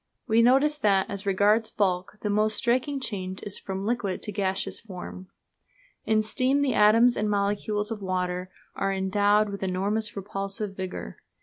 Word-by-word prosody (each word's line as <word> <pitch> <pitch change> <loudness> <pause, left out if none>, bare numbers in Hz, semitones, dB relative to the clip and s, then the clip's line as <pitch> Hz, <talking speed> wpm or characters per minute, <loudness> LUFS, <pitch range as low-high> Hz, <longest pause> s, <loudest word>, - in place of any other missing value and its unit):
We 225 -1 +4
notice 275 +5 +4
that, 195 -5 +3
as 200 0 -4
regards 210 +3 +3
bulk, 190 -1 -1
the 210 - -2
most 215 +1 +2
striking 260 +3 +1
change 190 -6 -4
is 205 - -4
from 190 0 -5
liquid 220 -5 -2
to 210 - -4
gaseous 195 -1 -2
form. 185 -2 -9 0.8
In 215 -1 +2
steam 260 +5 +1
the 265 -3 +1
atoms 225 +4 +5
and 210 0 0
molecules 205 +1 0
of 215 -2 -4
water 180 -1 -2 0.3
are 195 - 0
endowed 205 +2 +2
with 200 0 -6
enormous 200 +3 -1
repulsive 195 +1 -4
vigour. 180 - -6
205 Hz, 160 wpm, -26 LUFS, 190-220 Hz, 0.8 s, atoms